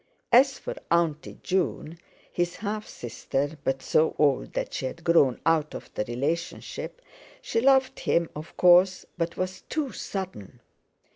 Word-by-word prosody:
As 270 +3 +6
for - - -5 0.2
"Auntie" 165 -3 0
June, 170 -3 -1 0.3
his 175 0 -1
half 210 0 -4
sister 135 +5 -3
(but 135 0 -1
so 155 +4 +2
old 145 -3 +2
that - - -3
she 130 - -2
had 165 +6 -8
grown 160 -7 +4
out 160 -2 +2
of - - -9
the - - -1
relationship) 160 - -4 0.4
she 230 - -1
loved 265 0 +4
him, 170 0 +1
of 155 +2 -9
course, 180 +1 +5
but 170 0 -2
was 185 +1 -3
too 300 -4 -1
sudden. 180 - -6
170 Hz, 145 wpm, -26 LUFS, 150-190 Hz, 0.4 s, As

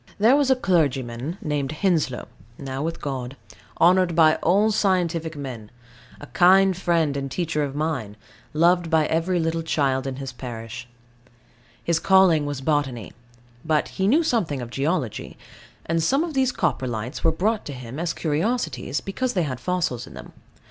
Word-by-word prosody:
There 225 +6 +5
was 285 -2 +2
a 265 - +5
clergyman 145 - 0
named 145 -1 -2
Henslow, 155 -7 0 0.3
now 135 -1 -5
with 165 +2 -3
God, 135 -2 -5 0.4
honoured 180 0 +4
by 155 -2 +5
all 205 +6 +3
scientific 175 -6 0
men, 125 -7 -7 0.5
a - - -9
kind 190 +4 +4
friend 170 -5 +1
and 135 -1 -3
teacher 160 +1 -2
of 140 -1 -4
mine, 145 -9 -3 0.3
loved 170 +2 +3
by 160 -2 +3
every 165 +3 0
little 165 0 -1
child 135 -4 0
in 135 - -3
his 135 -1 -6
parish. 120 -1 -7 1.0
His 170 -1 +1
calling 180 -6 +4
was 145 -2 -4
botany: 135 -6 -1 0.5
but 155 -1 +1
he 190 - -1
knew 300 +10 +4
something 185 - 0
of 120 -1 -7
geology. 140 - -2 0.5
And 165 0 0
some 275 - +2
of 335 -2 -4
these 265 -2 +2
Coprolites 120 - -2
were 165 - +4
brought 210 +7 -1
him 130 -1 -7
as 170 0 -1
curiosities, 155 - -2
because 250 +6 -2
they 180 - +1
had 130 -5 -4
fossils 160 -6 -2
in - - -12
them. - - -11
160 Hz, 160 wpm, -23 LUFS, 135-180 Hz, 1.0 s, There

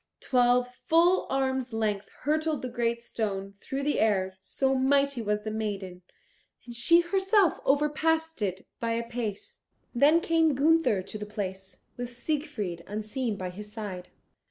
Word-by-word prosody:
Twelve 250 0 +3 0.2
full 345 +3 +4
arms' 265 -2 -1
length 210 -3 -1
hurtled 310 -1 0
the 255 - -3
great 235 -1 -1
stone 200 -4 -3
through 275 +1 -4
the 295 +1 +1
air, 190 -3 +1
so 270 +6 0
mighty 275 0 +2
was 210 -1 -1
the 215 - -3
maiden, 200 -4 -4 0.6
and 240 -1 -9
she 335 +9 +5
herself 385 +1 +2
overpassed 320 +2 +1
it 190 -2 -2
by 230 0 -1
a 230 0 -2
pace. 230 -4 -5 0.3
Then 290 +7 +5
came 325 -3 +2
Gunther 295 - +3
to 215 - -7
the 210 - -6
place, 190 -2 -6 0.2
with 245 0 -4
Siegfried 240 - -3
unseen 215 +3 -3
by 185 -1 -4
his 210 +3 -8
side. 200 -5 -6
240 Hz, 150 wpm, -28 LUFS, 210-290 Hz, 0.6 s, she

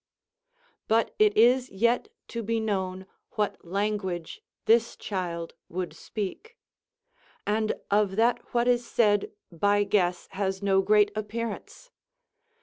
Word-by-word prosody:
But 225 +1 +2
it 210 -1 +4
is 245 +3 +5
yet 235 - +1 0.2
to 235 - -4
be 225 +1 -1
known 190 -3 -2 0.3
what 210 -2 -2
language 190 -2 -2 0.2
this 230 +1 +3
child 175 -4 -4 0.2
would 180 +1 -4
speak; 320 - -6 0.9
and 215 +1 +1 0.2
of 205 -2 +2
that 230 +3 +3
what 240 0 +1
is 245 -1 +3
said 210 -4 +2 0.2
by 205 +4 +2
guess 180 -4 +1
has 195 0 -2
no 195 -1 +4
great 210 +1 +4
appearance. 230 - -5
210 Hz, 120 wpm, -27 LUFS, 190-230 Hz, 0.9 s, is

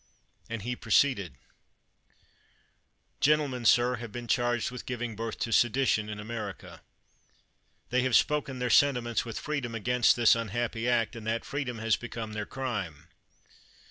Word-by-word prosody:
and 115 -3 -5
he 125 +2 -2
proceeded:] 105 - +2 1.8
Gentlemen, 140 -5 +2
sir, 120 +2 +4
have 115 -1 -8
been 120 +2 -7
charged 120 -1 +1
with 125 - -8
giving 120 -3 -4
birth 115 +1 -4
to 115 - -3
sedition 120 -2 +2
in 105 0 -6
America. 110 +1 -7 1.1
They 125 0 +3
have 130 -2 +1
spoken 145 -3 +2
their 125 -1 -1
sentiments 125 -4 +3
with 115 -2 -5
freedom 140 -6 -3
against 125 +2 +3
this 120 -1 +5
un 115 -1 -3
happy 120 +2 -2
act, 120 -1 +1
and 110 -2 -8
that 115 +1 -1
freedom 140 -4 -3
has 110 -1 +1
become 115 -2 -6
their 105 -1 -4
crime. 95 - -5
120 Hz, 145 wpm, -29 LUFS, 110-125 Hz, 1.8 s, this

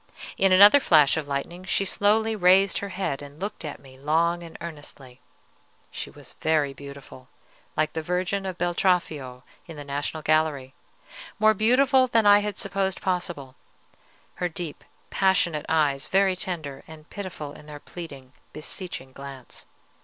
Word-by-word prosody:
In 195 0 +3
another 205 +9 +8
flash 155 - +5
of 155 -3 -3
lightning 145 +6 -4
she 195 +1 0
slowly 220 +3 +2
raised 190 0 +4
her 200 - -5
head 185 -8 -3
and 145 +1 -11
looked 200 -1 -5
at 150 -2 -6
me 130 -1 -16
long 165 +4 +1
and 165 -1 -10
earnestly. 145 -6 -10 0.7
She - - -5
was - - -12
very 155 -3 +1
beautiful, 140 -2 -12 0.5
like 155 0 +1
the 160 - -2
Virgin 185 +3 -2
of 185 -2 -5
Beltraffio 170 -8 0 0.2
in 165 -3 -9
the 145 - -7
National 145 +2 -4
Gallery, 150 -4 +1 0.6
more 215 0 +5
beautiful 255 +5 +4
than 225 -3 +2
I 205 0 +8
had 205 -1 -4
supposed 195 -1 -2
possible, 175 -8 -3 0.9
her 180 - +1
deep, 165 -2 -7 0.3
passionate 180 -5 +2
eyes 150 -4 +1
very 190 -1 +3
tender 160 -7 -5
and 155 0 -13
pitiful 155 -8 -7
in 150 - -14
their 150 -1 -9
pleading, 140 -6 -10 0.2
beseeching 155 -3 -6
glance. 135 -2 -10
165 Hz, 150 wpm, -25 LUFS, 145-190 Hz, 0.9 s, another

